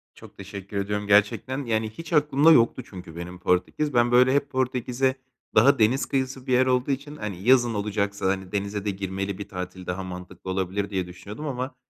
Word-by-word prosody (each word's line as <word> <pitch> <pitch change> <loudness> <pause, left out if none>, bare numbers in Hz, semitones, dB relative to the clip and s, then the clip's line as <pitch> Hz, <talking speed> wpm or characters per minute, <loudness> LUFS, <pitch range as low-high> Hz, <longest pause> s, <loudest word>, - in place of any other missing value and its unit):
Çok - - -15
teşekkür 100 0 -7
ediyorum 105 +1 -2
gerçekten. 105 +7 +2
Yani, 110 -1 0
hiç 165 +10 -8
aklımda 150 0 +5
yoktu 125 -2 +4
çünkü 90 -4 -10
benim 90 +1 -7
Portekiz. 90 +12 0
Ben 120 0 +3
böyle 125 +1 +5
hep 140 0 +1
Portekiz’e 130 0 0 0.4
daha 135 +5 +6
deniz 115 +5 +3
kıyısı 130 -1 -2
bir 130 - +1
yer 130 +1 +5
olduğu 130 +1 +1
için, 145 +2 -4
hani, 100 -8 -6
yazın 120 0 +4
olacaksa, 100 -1 -2
hani, 95 -1 -2
denize 100 0 -3
de - - +1
girmeli 95 0 -3
bir 100 - -7
tatil 90 0 -7
daha 90 +2 -3
mantıklı 90 0 -8
olabilir 95 +2 -2
diye 95 -3 -2
düşünüyordum 100 - -9
ama 130 -1 -4
105 Hz, 185 wpm, -25 LUFS, 95-130 Hz, 0.4 s, daha